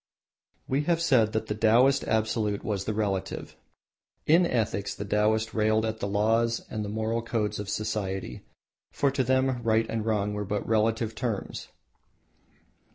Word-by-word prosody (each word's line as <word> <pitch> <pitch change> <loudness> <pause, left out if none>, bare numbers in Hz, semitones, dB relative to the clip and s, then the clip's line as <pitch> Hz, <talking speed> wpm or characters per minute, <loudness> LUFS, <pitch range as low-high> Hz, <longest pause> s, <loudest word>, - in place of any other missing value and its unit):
We 135 +2 +1
have 170 0 +2
said 130 -10 +3
that 110 0 -1
the 105 - -2
Taoist 120 +6 +4
Absolute 110 -2 0
was 100 -3 -2
the 110 - -1
Relative. 100 -3 -3 0.7
In 170 +3 +5
ethics 110 - -1
the 100 - -5
Taoist 110 +2 +1
railed 110 0 +2
at 110 0 -3
the 100 - -2
laws 115 +3 +1
and 110 - -3
the 105 - -5
moral 110 +2 -1
codes 110 -3 -2
of 105 -1 -5
society, 95 - -3 0.5
for 140 -1 +1
to 135 -1 0
them 130 0 +1
right 115 -1 +2
and 115 -1 -2
wrong 105 -2 0
were 105 0 -3
but 105 0 -3
relative 110 0 +1
terms. 110 -2 -4
110 Hz, 160 wpm, -27 LUFS, 105-115 Hz, 0.7 s, In